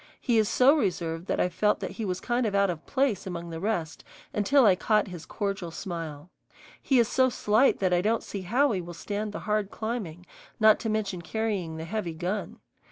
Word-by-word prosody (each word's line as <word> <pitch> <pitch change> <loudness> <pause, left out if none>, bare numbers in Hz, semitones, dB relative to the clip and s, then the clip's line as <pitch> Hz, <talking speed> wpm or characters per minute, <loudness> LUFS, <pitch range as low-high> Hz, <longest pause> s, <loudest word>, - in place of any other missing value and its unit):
He 235 -3 +2
is 215 - +2
so 270 +4 +5
reserved 175 - -2
that - - -1
I - - +3
felt 195 +4 +1
that - - -4
he 225 - -5
was 185 -2 -2
kind 240 -1 0
of 200 - -2
out 200 -2 +3
of 160 -3 -7
place 260 -9 0
among 170 -2 -5
the 165 - -5
rest 175 -5 -2 0.3
until 250 +6 +4
I 200 - +7
caught 210 +2 +1
his 175 -3 -9
cordial 195 -4 -3
smile. 165 -2 -6 0.5
He 265 - +2
is 235 -2 +4
so 260 +2 +3
slight 225 +2 +3
that 185 -2 +1
I 175 - +3
don't 220 +3 +1
see 200 - -6
how 250 +10 +2
he 190 -4 -1
will 175 0 -9
stand 210 +3 -4
the - - -6
hard 210 -1 0
climbing, 210 -8 -5 0.3
not 215 -1 +6
to 225 - -3
mention 205 -4 -2
carrying 195 -4 -2
the 160 - -5
heavy 175 -3 -3
gun. 185 +5 -3
200 Hz, 215 wpm, -27 LUFS, 175-220 Hz, 0.5 s, I